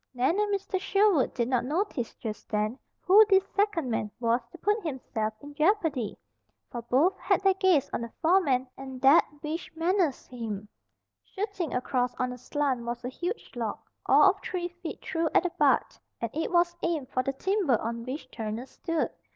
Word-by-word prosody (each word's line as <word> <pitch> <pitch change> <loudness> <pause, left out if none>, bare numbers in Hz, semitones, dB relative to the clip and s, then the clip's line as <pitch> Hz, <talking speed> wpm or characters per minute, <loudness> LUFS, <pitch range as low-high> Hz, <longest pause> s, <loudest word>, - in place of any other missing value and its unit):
Nan 265 +10 +2
and 420 -1 +1
Mr. 385 -1 -2
Sherwood 395 -7 +3
did 235 -2 0
not 250 -2 +1
notice 295 - -2
just 215 -2 -7
then 215 +4 -1 0.2
who 400 +4 +7
this 385 -1 +5
second 400 - +1
man 215 -1 -1
was 235 +1 +2
who - - -11
put 415 +4 +1
himself 255 -7 -3
in 290 0 -10
jeopardy, 310 - +1 0.5
for 240 - -4
both 270 +11 +2
had - - +2
their 390 -1 +5
gaze 370 -7 +3
on - - -1
the 235 -1 -6
foreman 315 -7 +3
and 265 -1 -8
that 275 +4 +7 0.2
which 320 +2 -4
menaced 335 -3 0
him. 215 -4 -5 0.6
Shooting 390 -6 -4
across 250 0 0
on 250 0 -2
a - - -9
slant 270 -2 -1
was 240 +1 -5
a - - -2
huge 350 - -5
log, 230 -3 -2 0.3
all - - +7
of 400 +1 -13
three 355 -1 -3
feet 350 -2 -8
through 325 0 0
at - - +6
the 360 - -1
butt, - - +2 0.2
and 230 -2 -3
it 320 - -2
was 345 0 +3
aimed 315 -6 -1
for 255 - +1
the 275 +2 -2
timber 365 - +1
on 230 +1 -3
which 260 +2 -6
Turner 220 +2 -4
stood. 330 +4 -2
290 Hz, 185 wpm, -28 LUFS, 245-360 Hz, 0.6 s, who